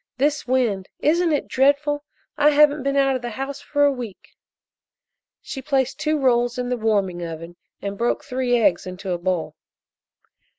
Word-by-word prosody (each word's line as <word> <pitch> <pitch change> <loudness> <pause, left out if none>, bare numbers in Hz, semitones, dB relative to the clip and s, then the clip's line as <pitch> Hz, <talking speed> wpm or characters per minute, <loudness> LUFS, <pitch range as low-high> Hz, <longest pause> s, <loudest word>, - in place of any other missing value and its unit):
This 290 +1 0
wind 235 -7 0
isn't 335 +3 +3
it 295 - 0
dreadful? 285 +2 +2 0.3
I 295 0 +5
haven't 295 0 +4
been 275 +1 -1
out 270 -1 +3
of 255 - -3
the 240 - -4
house 270 +4 -5
for 290 0 0
a 285 - +4
week." 240 -7 -8 1.1
She 270 - -6
placed 270 -1 0
two 305 0 +1
rolls 245 -3 +2
in 250 0 -2
the 250 - +1
warming 200 -6 0
oven 165 +1 -7 0.3
and 200 0 -4
broke 235 +1 0
three 250 -2 0
eggs 195 -6 +2
into 185 +1 -6
a 175 - -1
bowl. 180 -2 -2
255 Hz, 170 wpm, -22 LUFS, 205-285 Hz, 1.1 s, I